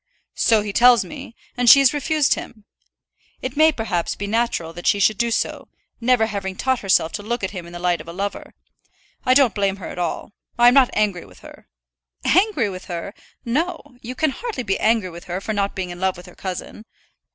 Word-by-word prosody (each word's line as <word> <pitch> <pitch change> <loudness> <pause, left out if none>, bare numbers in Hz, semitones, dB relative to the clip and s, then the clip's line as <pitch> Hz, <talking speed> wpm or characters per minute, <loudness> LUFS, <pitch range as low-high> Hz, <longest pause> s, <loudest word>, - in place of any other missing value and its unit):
"So 220 -3 +3
he 205 -1 -5
tells 245 0 +5
me; 275 -6 -10 0.2
and 245 -1 +3
she - - +10
has 275 -1 +4
refused 295 0 +1
him. 215 -3 -8 0.7
It 255 +1 -5
may 315 +2 +5
perhaps 220 - -2
be 205 - -5
natural 205 -6 -1
that 175 +1 -6
she 205 - +3
should 210 +1 +2
do 235 - +1
so, 230 - -2 0.3
never 240 -1 +3
having 200 -3 -4
taught 260 +4 0
herself 190 -4 +2
to - - -5
look 235 +1 -3
at 190 - -2
him 180 -4 -7
in - - -12
the 175 - -7
light 175 -2 0
of 160 - -14
a - - -6
lover. 200 +3 -5 0.7
I 255 - +5
don't 265 -5 +5
blame 200 -2 0
her 195 - -8
at - - -7
all. 175 +3 -3 0.3
I 240 0 +7
am - - +2
not 265 -2 +5
angry 205 -4 0
with 90 -2 -18
her." - - -14 0.6
"Angry 370 - +3
with 185 0 -8
her! 175 +2 -6 0.3
No. 290 +1 -3
You 250 +2 -7
can 310 +2 +1
hardly 440 - -5
be 195 -4 -1
angry 220 -5 +1
with 170 +1 -11
her 180 +1 -4
for 215 +2 -4
not 200 -1 -1
being 185 -2 -4
in 175 - -9
love 190 -1 0
with 175 - -12
her 180 - -14
cousin." 190 +3 -6
215 Hz, 220 wpm, -21 LUFS, 185-250 Hz, 0.7 s, she